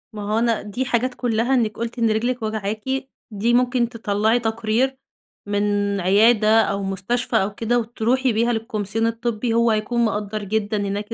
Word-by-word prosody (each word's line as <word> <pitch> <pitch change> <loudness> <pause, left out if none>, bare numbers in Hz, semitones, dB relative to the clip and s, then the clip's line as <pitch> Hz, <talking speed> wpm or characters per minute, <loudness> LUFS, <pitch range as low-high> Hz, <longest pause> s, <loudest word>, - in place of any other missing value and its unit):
ما 210 - -5
هو 220 - +2
أنا 230 -1 +1
دي 225 +6 -4
حاجات 250 +1 0
كُلّها 240 +1 0
إنِّك 220 -5 +1
قُلتِ 235 +1 -4
إن 230 -1 +3
رجلِك 240 +3 -1
واجعاكِ، 215 -1 -3 0.5
دي 220 +4 0
ممكن 245 -1 +2
تطلّعي 220 0 0
تقرير 230 +3 0 0.5
من 205 -1 0
عيادة 215 +3 +4
أو 200 -1 -1
مستشفى 200 +6 -2
أو 200 -1 +2
كده 240 +2 +1
وتروحي 240 +2 0
بيها 235 +2 +1
للكومسيون 225 -1 -2
الطبّي 230 0 -2
هو 235 0 +3
هيكون 230 +2 0
مقدّر 210 -1 -3
جدًا 210 +1 -1
هناك 205 +2 -3
225 Hz, 160 wpm, -22 LUFS, 210-235 Hz, 0.5 s, عيادة